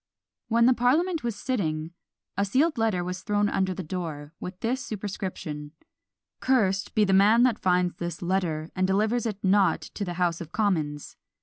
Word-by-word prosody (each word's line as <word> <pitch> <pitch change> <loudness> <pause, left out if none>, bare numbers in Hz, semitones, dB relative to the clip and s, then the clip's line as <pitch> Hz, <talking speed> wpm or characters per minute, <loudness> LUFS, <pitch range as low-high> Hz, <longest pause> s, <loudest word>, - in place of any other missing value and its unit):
When 235 0 +3
the 255 - +6
parliament 305 +8 +1
was 235 -3 -2
sitting, 165 -12 -2 0.4
a 200 - +1
sealed 270 +8 +1
letter 215 -6 +1
was 180 +1 -4
thrown 205 0 +1
under 190 -2 0
the 185 - -5
door, 155 -3 -5
with 180 0 -7
this 255 +4 -1
superscription, 185 - -5 0.7
Cursed 195 -7 +1
be 215 - +4
the 195 -1 +2
man 210 +5 +6
that 250 -4 +2
finds 180 -1 +1
this 175 +1 -5
letter, 170 -4 -1
and 185 0 +1
delivers 215 +5 +1
it 210 -3 -3
not 190 -3 +3
to 180 +6 -6
the 175 -3 -4
House 175 -1 0
of 165 -1 -8
Commons. 160 -9 -1
195 Hz, 175 wpm, -26 LUFS, 175-225 Hz, 0.7 s, the